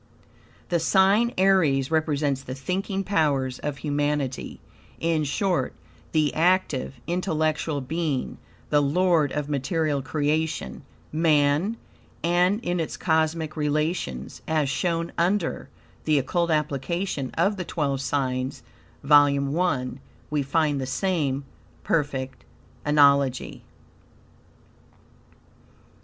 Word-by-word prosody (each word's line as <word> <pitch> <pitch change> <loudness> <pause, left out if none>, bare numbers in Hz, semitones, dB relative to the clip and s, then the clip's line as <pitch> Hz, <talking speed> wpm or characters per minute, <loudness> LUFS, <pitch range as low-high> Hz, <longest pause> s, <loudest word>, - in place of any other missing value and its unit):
The 170 - +2
sign 195 +7 +4
Aries 165 -8 +3
represents 145 -4 +1
the 130 -1 -7
thinking 190 +7 -2
powers 140 -9 0
of 145 -1 -4
humanity; 145 -1 -2 0.4
in 165 -2 +1
short, 180 +6 0 0.4
the 150 -4 +2
active, 160 -7 +1
intellectual 155 -4 -1
being, 150 -1 -2 0.3
the 145 -1 +4
lord 160 0 +2
of 150 -1 -2
material 150 +1 0
creation 150 - -1 0.3
Man; 155 +5 +2 0.5
and 180 +4 +3
in 175 0 0
its 160 - -3
cosmic 160 -1 0
relations, 150 - -2
as 155 -3 +1
shown 170 +3 -1
under 175 +1 0 0.4
"The 155 -1 +3
Occult 170 +6 0
Application 150 0 -1
of 195 +5 +2
the 185 - -3
Twelve 140 -5 -2
Signs" 130 -2 -2 0.4
(vol. 140 +1 +4
I), 140 -9 +1 0.4
we 150 -1 +1
find 145 0 +1
the 130 - -3
same 145 -4 -1 0.4
perfect 135 -4 -1 0.4
analogy. 140 -3 +3
150 Hz, 100 wpm, -25 LUFS, 140-170 Hz, 0.5 s, sign